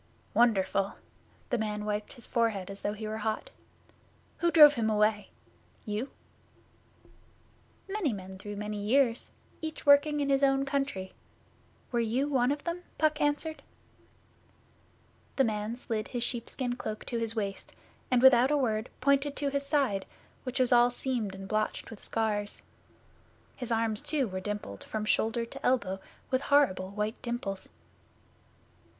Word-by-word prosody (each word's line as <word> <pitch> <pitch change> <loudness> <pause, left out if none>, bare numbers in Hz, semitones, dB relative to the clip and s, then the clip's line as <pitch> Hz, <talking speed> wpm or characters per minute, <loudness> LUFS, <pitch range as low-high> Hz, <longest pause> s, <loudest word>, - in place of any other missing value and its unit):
'Wonderful!' 195 -4 +2 0.6
The 245 - +1
man 210 -1 -2
wiped 210 0 -3
his 240 - -5
forehead 215 -5 0
as 195 - -9
though 205 - -1
he 215 0 -6
were 215 +1 -4
hot. 220 - -2 0.9
'Who 345 - +3
drove 300 -3 +9
him 225 -5 0
away? 210 -1 +2 0.6
You?' 215 +5 -3 1.8
'Many 390 -7 0
men 190 -2 -7
through 205 +1 -6
many 210 0 -4
years, 235 +2 +2 0.3
each 315 -1 -5
working 290 +1 +6
in 285 -1 0
his 275 0 +3
own 270 0 +3
country. 275 -9 -2 0.8
Were 240 - +1
you 235 +5 +1
one 260 -3 +2
of 290 0 -3
them?' 340 +1 -3 0.2
Puck 305 -1 +2
answered. 295 +2 0 1.7
The 270 - +4
man 215 -1 -1
slid 225 -4 -3
his 245 -2 -3
sheepskin 245 +1 -3
cloak 215 -3 -5
to 235 - -2
his 225 0 -1
waist, 200 -3 -4 0.3
and 250 -1 +3
without 260 0 +7
a 295 - +3
word 220 -4 0
pointed 280 +1 +2
to 285 - -1
his 280 0 -2
side, 265 -10 +1 0.4
which 255 +1 -2
was 255 -1 +4
all 240 0 +6
seamed 245 -5 -2
and 195 0 -8
blotched 215 +2 -1
with 220 - -10
scars. 210 -2 -2 0.9
His 245 -2 -6
arms, 225 -2 +1
too, 290 -5 0
were 185 -2 -4
dimpled 205 - -5
from 215 -1 -4
shoulder 225 +2 +1
to - - -11
elbow 200 -7 +1 0.3
with 260 0 +2
horrible 235 -12 +3
white 210 +3 -3
dimples. 220 -5 -4
235 Hz, 150 wpm, -30 LUFS, 210-275 Hz, 1.8 s, drove